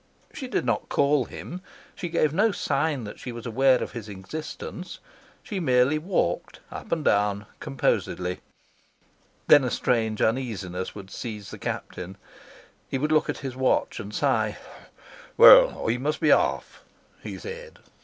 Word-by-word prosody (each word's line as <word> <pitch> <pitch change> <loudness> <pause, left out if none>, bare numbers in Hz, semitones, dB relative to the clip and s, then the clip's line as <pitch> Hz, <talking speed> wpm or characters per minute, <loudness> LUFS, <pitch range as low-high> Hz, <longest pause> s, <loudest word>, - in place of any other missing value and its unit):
She 260 - -6
did 250 - -1
not - - -1
call 140 -2 +2
him; 180 +9 -8 0.3
she 175 - -5
gave 155 -3 +1
no 210 +6 +3
sign 145 -5 -1
that 105 - -8
she 125 - -6
was 120 -1 -8
aware 130 +2 +3
of - - -6
his 115 -3 -7
existence; 155 - -7 0.5
she 200 - -4
merely 130 -1 +3
walked 155 - -1
up - - -8
and 160 -3 -1
down 100 0 +2
composedly. 90 +6 -1 1.1
Then 145 - +7
a 125 - 0
strange 110 -3 0
uneasiness 105 -7 -2
would 100 -2 -10
seize 105 -5 -7
the - - -9
Captain; 90 +2 -5 0.7
he - - -1
would 150 +3 -1
look 155 -1 +3
at - - -1
his 130 -1 -4
watch 130 -2 +1
and 105 -2 -7
sigh. - - 0 0.8
"Well, - - +8
I 115 +2 +1
must 145 +4 -2
be 155 - +3
off," - - +1 0.4
he - - -7
said. 475 +1 -9
130 Hz, 155 wpm, -25 LUFS, 105-155 Hz, 1.1 s, Well